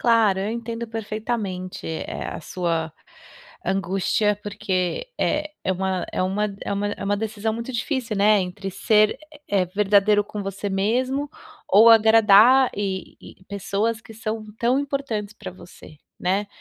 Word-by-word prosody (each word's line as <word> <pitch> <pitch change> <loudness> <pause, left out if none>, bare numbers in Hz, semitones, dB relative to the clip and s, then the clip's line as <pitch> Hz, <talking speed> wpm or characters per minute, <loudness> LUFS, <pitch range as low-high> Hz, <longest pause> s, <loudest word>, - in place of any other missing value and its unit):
Claro, 225 -5 +4
eu 195 +2 -2
entendo 235 0 -4
perfeitamente, 215 -4 -4
eh, 160 - -5
a - - -7
sua 165 -1 -2 0.7
angústia 195 +3 0
porque, 195 - -2
eh, 305 0 0
é - - -3
uma 190 0 -2
é - - 0
uma 200 +2 -1
é - - -4
uma 200 +1 -1
é - - -8
uma 205 +1 0
decisão 220 0 -2
muito 235 +3 -5
difícil, 240 -2 -2
né, 205 +1 +4
entre 190 +1 -4
ser, 210 +4 +3 0.3
eh, 195 -2 +2
verdadeiro 205 +2 +3
com 205 0 -6
você 195 +1 -4
mesmo, 255 +9 0 0.4
ou 220 +4 +7
agradar 225 +3 +6
e 195 -2 -4
e - - -15
pessoas 200 +3 -1
que 225 - -14
são 220 0 -4
tão 245 +4 +2
importantes 275 -8 -3
pra 195 - -8
você, 175 -4 -14 0.2
né. 195 +3 0
210 Hz, 150 wpm, -23 LUFS, 195-225 Hz, 0.7 s, ou